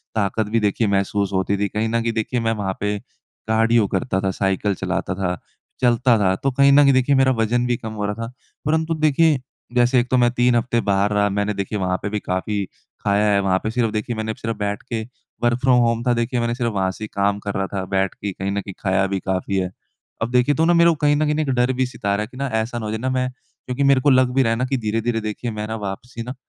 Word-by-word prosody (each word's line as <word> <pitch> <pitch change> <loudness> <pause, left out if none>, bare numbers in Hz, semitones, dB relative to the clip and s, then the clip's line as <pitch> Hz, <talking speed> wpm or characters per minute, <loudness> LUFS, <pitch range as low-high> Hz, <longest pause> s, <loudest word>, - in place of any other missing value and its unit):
ताकत 110 +1 0
भी 115 +1 +2
देखिए 105 +1 +1
महसूस 100 0 0
होती 95 +1 0
थी। 100 +1 0
कहीं 110 +3 -1
न 115 +1 +1
कहीं 115 0 -1
देखिए, 110 +2 -1
मैं 115 -1 0
वहाँ 100 -3 -2
पे 105 0 -1 0.5
कार्डियो 110 0 +3
करता 120 -4 -1
था, 95 -1 0
साइकिल 95 +1 0
चलाता 90 - -2
था, 90 -3 -2 0.4
चलता 120 -1 +4
था, 95 -2 +2
तो 135 +8 -1
कहीं 140 +2 +4
न 140 - +6
कहीं 140 -1 +5
देखिए, 130 +2 +3
मेरा 135 0 +4
वज़न 120 +2 +1
भी 120 -1 +1
कम 110 - -7
हो 105 -1 -3
रहा 105 - -1
था। 115 - -9 0.3
परंतु 160 +2 +1
देखिए, 155 -1 +3 0.4
जैसे 125 +1 +4
एक 120 +1 -1
तो 130 - +3
मैं 120 -1 +4
3 125 0 +2
हफ़्ते 120 0 +1
बाहर 100 +1 +2
रहा, 105 0 +2
मैंने 100 +1 -1
देखिए 100 +1 -3
वहाँ 90 -1 0
पे 100 - -1
भी 105 0 -2
काफ़ी 100 +2 -2 0.4
खाया 100 +1 +2
है, 100 - +3
वहाँ 95 -1 +1
पे 110 - -1
सिर्फ़, 115 -2 0
देखिए, 110 +2 -3
मैंने 110 0 -3
सिर्फ 115 -1 -4
बैठ 105 0 -2
के 115 -1 -1 0.4
वर्क 120 0 +2
फ्रॉम 130 -2 +4
होम 115 0 +1
था, 125 - +2
देखिए, 120 +1 -1
मैंने 120 0 -1
सिर्फ़ 120 -2 -1
वहाँ 95 -2 0
से 110 - -9
ही - - -3
काम 100 0 +1
कर 100 - -1
रहा 95 0 -1
था 95 -1 -2
बैठ 95 0 +1
के, 100 - -4
कहीं 95 +1 -4
न 100 0 -1
कहीं 100 0 -8
खाया 95 0 +1
भी 95 0 -2
काफ़ी 95 +1 -1
है। 90 -1 -1 0.5
अब 115 +1 -1
देखिए 125 +3 +3
तो 160 - +2
ना 175 - +4
मेरे 170 0 +6
को 165 - +2
कहीं 145 -1 +2
न 155 +1 +1
कहीं 150 +1 0
एक 150 - -2
डर 125 +1 +2
भी 130 0 0
सता 100 -5 -2
रहा 105 +1 -1
कि 125 +3 -14
ना, 140 +1 -2
ऐसा 115 0 -2
ना 110 - -5
हो 105 - -3
जाए 110 - -3
ना, 130 +3 -1
मैं 130 0 0 0.4
क्योंकि 125 +2 -1
मेरे 140 -1 +4
को 145 - +3
लग 130 -1 +4
भी 135 - +4
रहा 115 - +1
है 115 - 0
ना 125 - 0
कि 135 +1 -1
धीरे-धीरे, 115 +1 -1
देखिए, 110 +2 -4
मैं 105 0 -4
ना 110 - -3
वापसी 105 +4 -6
ना 125 +2 -6
115 Hz, 270 wpm, -21 LUFS, 100-125 Hz, 0.5 s, न